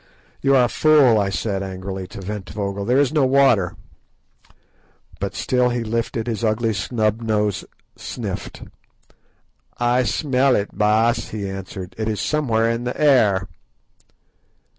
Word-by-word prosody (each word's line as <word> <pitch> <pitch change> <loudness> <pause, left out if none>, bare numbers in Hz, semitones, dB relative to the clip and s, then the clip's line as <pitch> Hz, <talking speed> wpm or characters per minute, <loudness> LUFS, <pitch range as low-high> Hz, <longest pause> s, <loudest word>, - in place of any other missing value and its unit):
"You 135 0 +3
are 130 - +5
a - - +3
fool," 140 -5 +4
I 100 -1 0
said 95 +2 -2
angrily 95 0 -6
to 100 - -9
Ventvögel; 100 0 -5
"there 125 +2 +3
is 145 +1 +2
no 150 -3 +3
water." 130 -9 +3 1.4
But 100 -1 -4
still 125 +4 +1
he 120 -1 -2
lifted 115 0 -2
his 115 -1 -3
ugly 110 +1 +1
snub 110 +1 -1
nose 105 -3 0
and - - -23
sniffed. - - -6 1.1
"I 120 +1 +2
smell 130 +2 +1
it, 100 - -2
Baas," 110 +3 +2
he 105 -2 -4
answered; 95 -1 -7
"it 110 - -1
is 105 -2 -2
somewhere 115 -7 +1
in 115 +1 -1
the 125 - -4
air." 110 -11 +3
110 Hz, 140 wpm, -21 LUFS, 100-125 Hz, 1.4 s, are